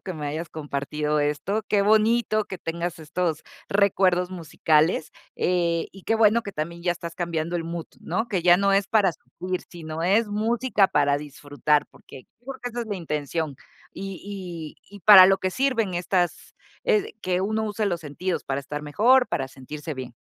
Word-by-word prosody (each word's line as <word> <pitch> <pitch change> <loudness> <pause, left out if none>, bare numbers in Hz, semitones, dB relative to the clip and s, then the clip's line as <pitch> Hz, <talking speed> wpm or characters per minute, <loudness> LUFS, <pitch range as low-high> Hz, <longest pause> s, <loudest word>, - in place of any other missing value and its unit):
que 185 - -6
me 150 -2 -5
hayas 160 +3 -5
compartido 150 0 -2
esto. 150 +9 -1
Qué 205 - +3
bonito 215 +1 +3
que 190 - -7
tengas 170 +1 -4
estos 160 0 -2 0.3
recuerdos 185 -3 +2
musicales, 160 -2 +1 0.3
eh, 170 -2 0
y 195 -1 -13
qué 225 - +1
bueno 225 +1 +4
que 200 - -7
también 170 +2 -5
ya 175 -1 +2
estás 170 -1 -8
cambiando 170 0 -2
el 165 - -3
mood, 165 0 -5
¿no? 230 +2 -2
Que 185 -6 -1
ya 175 0 +6
no 200 0 +2
es 195 0 +3
para 200 -4 +3
sufrir, 180 +7 -6
sino 160 -1 -6
es 205 +5 +3
música 220 0 +2
para 145 -1 +2
disfrutar, 145 0 -1
porque, 130 - -14
creo 270 +2 -7
que 245 - -3
esa 240 - -4
es - - -9
la 205 -2 -3
intención, 150 -2 -3 0.4
y 190 -4 -7
y 205 - -13
y - - -13
para 190 -1 +10
lo 195 0 +3
que 185 - -1
sirven 230 -5 0
estas 175 -1 -1 0.3
eh, 435 -2 +1
que 180 0 0
uno 220 +3 -1
use 210 0 -1
los 175 -4 -1
sentidos 165 +4 -3
para 135 0 -2
estar 150 +2 -6
mejor, 240 - +4
para 135 0 -2
sentirse 150 +4 -8
bien. 130 -2 -8
175 Hz, 185 wpm, -25 LUFS, 155-205 Hz, 0.4 s, para